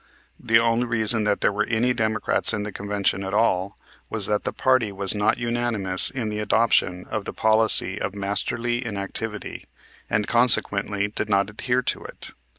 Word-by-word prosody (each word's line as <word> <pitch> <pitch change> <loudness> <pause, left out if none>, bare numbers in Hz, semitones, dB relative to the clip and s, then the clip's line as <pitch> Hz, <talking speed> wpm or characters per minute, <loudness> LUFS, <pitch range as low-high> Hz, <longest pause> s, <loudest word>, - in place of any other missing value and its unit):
The 115 - +3
only 115 +1 +1
reason 110 -1 +1
that 105 -1 0
there - - +2
were 105 +1 -1
any 120 +2 +1
Democrats 110 0 0
in 105 - -4
the 105 - -6
Convention 100 -1 -2
at 95 +1 -4
all 100 -3 0 0.3
was 110 -3 0
that 105 0 -1
the - - -1
party 130 -5 +1
was 100 -1 +1
not 105 +1 +1
unanimous 115 -6 +2
in 120 -5 -4
the 105 0 -4
adoption 105 -4 +1
of 105 -2 -3
the - - -6
policy 110 -3 +3
of 100 - -4
"Masterly 115 +5 -3
Inactivity," 105 0 -6 0.4
and 105 -1 0
consequently 105 -4 +2
did 105 0 -4
not 100 0 +1
adhere 125 +4 -1
to - - -3
it. - - -8
105 Hz, 170 wpm, -23 LUFS, 100-115 Hz, 0.4 s, The